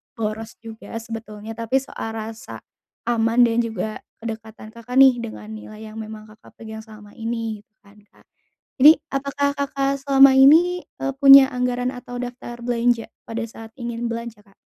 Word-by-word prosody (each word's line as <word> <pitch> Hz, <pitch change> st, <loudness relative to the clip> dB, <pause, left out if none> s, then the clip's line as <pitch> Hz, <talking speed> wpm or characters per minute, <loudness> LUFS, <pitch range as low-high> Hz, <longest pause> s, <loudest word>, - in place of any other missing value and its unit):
boros 220 Hz, 0 st, -4 dB
juga 225 Hz, 0 st, -10 dB
sebetulnya, 225 Hz, -1 st, -7 dB
tapi 230 Hz, +2 st, -3 dB
soal 260 Hz, -4 st, -3 dB
rasa 220 Hz, 0 st, -8 dB, 0.4 s
aman 235 Hz, +1 st, +2 dB
dan 235 Hz, 0 st, +2 dB
juga 220 Hz, -2 st, -3 dB, 0.2 s
kedekatan 220 Hz, -1 st, -8 dB
Kakak 235 Hz, +2 st, -9 dB
nih 265 Hz, -2 st, +6 dB
dengan 220 Hz, -2 st, -8 dB
nilai 215 Hz, 0 st, -10 dB
yang 220 Hz, -, -9 dB
memang 215 Hz, 0 st, -8 dB
Kakak 215 Hz, -, -19 dB
pegang 220 Hz, -1 st, -9 dB
selama 215 Hz, -2 st, -14 dB
ini 225 Hz, -2 st, -3 dB
gitu 210 Hz, -, -44 dB
kan, 205 Hz, +1 st, -20 dB
Kak. -, -, -26 dB, 0.6 s
Jadi. 300 Hz, +4 st, +10 dB, 0.2 s
Apakah 280 Hz, +1 st, -1 dB
Kakak 275 Hz, 0 st, -1 dB
selama 275 Hz, -1 st, +6 dB
ini, 330 Hz, +7 st, +5 dB, 0.2 s
eee, 275 Hz, -, -2 dB
punya 275 Hz, -1 st, +10 dB
anggaran 250 Hz, 0 st, -1 dB
atau 245 Hz, 0 st, -9 dB
daftar 245 Hz, -1 st, -7 dB
belanja 240 Hz, -1 st, +1 dB, 0.2 s
pada 230 Hz, 0 st, -3 dB
saat 225 Hz, 0 st, -12 dB
ingin 235 Hz, -1 st, -4 dB
belanja, 230 Hz, -2 st, -6 dB
Kak? 195 Hz, -1 st, -26 dB
230 Hz, 160 wpm, -22 LUFS, 220-250 Hz, 0.6 s, Jadi